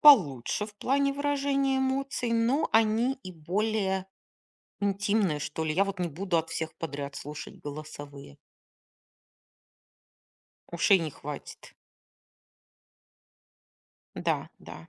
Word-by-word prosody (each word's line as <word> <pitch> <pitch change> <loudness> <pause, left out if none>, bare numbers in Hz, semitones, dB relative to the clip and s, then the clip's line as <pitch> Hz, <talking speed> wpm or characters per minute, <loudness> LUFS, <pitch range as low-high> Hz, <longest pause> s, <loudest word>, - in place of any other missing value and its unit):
получше 200 - +6
в 210 - -13
плане 275 +5 +2
выражения 275 -1 +1
эмоций, 265 -2 0
но 240 +7 +2
они 225 +4 +4
и 185 - -7
более 190 +3 0 0.7
интимные, 200 -4 +1
что 160 +2 -3
ли. 155 - 0
Я 190 +5 +4
вот 195 -2 -4
не 175 - +1
буду 175 +3 0
от 160 0 -1
всех 160 -1 -3
подряд 140 -3 -5
слушать 150 +2 -7
голосовые. 145 - -8 2.3
Ушей 180 +3 +5
не 160 -3 -2
хватит. 145 +1 -8 2.4
Да, - - 0
да, 80 - -11
195 Hz, 105 wpm, -29 LUFS, 155-235 Hz, 2.4 s, получше